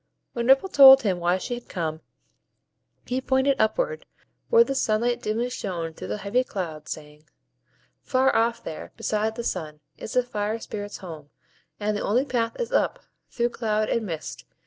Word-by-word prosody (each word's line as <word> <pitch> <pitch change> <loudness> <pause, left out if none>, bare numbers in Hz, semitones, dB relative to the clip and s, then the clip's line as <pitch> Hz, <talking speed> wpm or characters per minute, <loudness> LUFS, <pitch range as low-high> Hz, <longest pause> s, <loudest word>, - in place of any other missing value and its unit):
When 235 0 -2
Ripple 270 +8 +5
told 270 -4 +9
him 190 -5 0
why 175 +1 +2
she 190 - -4
had 240 0 -8
come, 160 -3 -3 1.0
he 255 +1 -2
pointed 265 0 +2
upward, 475 - 0 0.4
where 465 0 +7
the 275 - -3
sunlight 240 -1 0
dimly 230 +4 -1
shone 170 -8 -4
through - - -8
the - - -3
heavy 210 +5 0
clouds, 165 -10 -6
saying,— 150 0 -9 0.7
"Far 265 0 +2
off 230 +1 +1
there, 155 - -7
beside 215 +1 -1
the 235 - -4
sun, 155 -8 -4 0.2
is - - -7
the 250 - +3
Fire 215 -2 -2
Spirits' 205 -2 -6
home; 155 -4 -9 0.5
and 210 0 -1
the 205 - -2
only 245 +6 +1
path 240 - -2
is 480 - -2
up, - - 0 0.3
through 240 0 0
cloud 215 -3 -1
and 230 - 0
mist. 160 -3 -6
220 Hz, 170 wpm, -25 LUFS, 185-255 Hz, 1.0 s, told